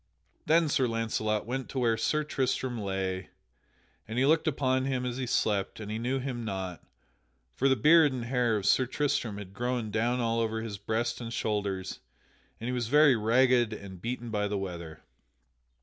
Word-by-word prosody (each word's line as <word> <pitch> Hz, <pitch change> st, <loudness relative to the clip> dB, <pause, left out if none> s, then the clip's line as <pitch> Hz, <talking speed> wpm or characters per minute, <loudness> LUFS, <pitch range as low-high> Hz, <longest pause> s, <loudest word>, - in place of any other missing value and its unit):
Then 165 Hz, +1 st, +4 dB
Sir 135 Hz, -3 st, +2 dB
Launcelot 110 Hz, -2 st, -1 dB
went 130 Hz, +3 st, -4 dB
to -, -, -6 dB
where 120 Hz, -3 st, +2 dB
Sir 150 Hz, +7 st, 0 dB
Tristram 130 Hz, -4 st, -1 dB
lay, 95 Hz, -1 st, -3 dB, 0.8 s
and 110 Hz, -, -5 dB
he 130 Hz, -, +3 dB
looked 160 Hz, +3 st, +3 dB
upon 130 Hz, -3 st, +1 dB
him 130 Hz, -2 st, -1 dB
as 125 Hz, 0 st, -3 dB
he 130 Hz, -1 st, -3 dB
slept 105 Hz, -4 st, 0 dB
and 105 Hz, -1 st, -6 dB
he 110 Hz, -, -3 dB
knew 125 Hz, +3 st, -1 dB
him 125 Hz, -3 st, -4 dB
not; 95 Hz, -4 st, -4 dB, 0.7 s
for 135 Hz, -, +2 dB
the 135 Hz, -, +4 dB
beard 150 Hz, +4 st, +6 dB
and 125 Hz, -2 st, -4 dB
the -, -, -6 dB
hair 120 Hz, -3 st, +1 dB
of 100 Hz, -, -4 dB
Sir 130 Hz, +5 st, +4 dB
Tristram 125 Hz, -6 st, -1 dB
had 100 Hz, -2 st, -9 dB
grown 120 Hz, 0 st, -2 dB
down 120 Hz, +4 st, +1 dB
all 115 Hz, -1 st, +1 dB
over 110 Hz, -1 st, -1 dB
his 105 Hz, -3 st, -6 dB
breast 115 Hz, +4 st, -2 dB
and 115 Hz, -1 st, -5 dB
shoulders 100 Hz, -4 st, -2 dB, 0.6 s
and 115 Hz, -, -5 dB
he -, -, -1 dB
was 120 Hz, -3 st, -1 dB
very 145 Hz, +1 st, +6 dB
ragged 120 Hz, +1 st, +3 dB
and 95 Hz, -4 st, -9 dB
beaten 120 Hz, +1 st, -4 dB
by 105 Hz, -1 st, 0 dB
the 105 Hz, 0 st, -2 dB
weather. 85 Hz, -5 st, -6 dB
115 Hz, 190 wpm, -29 LUFS, 105-130 Hz, 0.8 s, beard